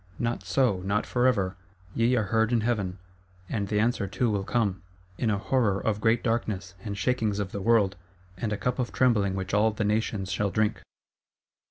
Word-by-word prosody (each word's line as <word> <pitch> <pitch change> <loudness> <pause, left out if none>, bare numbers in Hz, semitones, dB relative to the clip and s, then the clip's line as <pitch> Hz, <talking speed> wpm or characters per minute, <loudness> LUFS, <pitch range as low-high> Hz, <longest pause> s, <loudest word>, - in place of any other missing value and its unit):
—Not 120 0 -1
so: 125 -8 +2
not 100 +2 0
forever! 120 -7 +1 0.4
Ye 120 +2 +2
are 110 - +2
heard 110 +1 +3
in 120 -2 +2
Heaven. 105 -5 -1 0.5
And 100 -1 -2
the 105 +1 0
answer 110 -2 +1
too 120 +3 0
will 100 -2 0
come,—in 95 -1 -2
a 105 - +1
horror 105 -2 +1
of 105 -1 -1
great 110 +2 +2
darkness, 105 -6 -1
and 100 -3 -4
shakings 110 0 0
of 100 -2 -3
the 100 - -4
world, 105 -3 +3 0.4
and 105 +4 -3
a 105 - -1
cup 125 +4 -2
of 125 - -1
trembling 105 -7 +2
which 95 0 -4
all 105 +1 +4
the 105 -1 -2
nations 105 -2 -1
shall 100 +1 0
drink. 105 +2 0
105 Hz, 185 wpm, -27 LUFS, 100-115 Hz, 0.5 s, all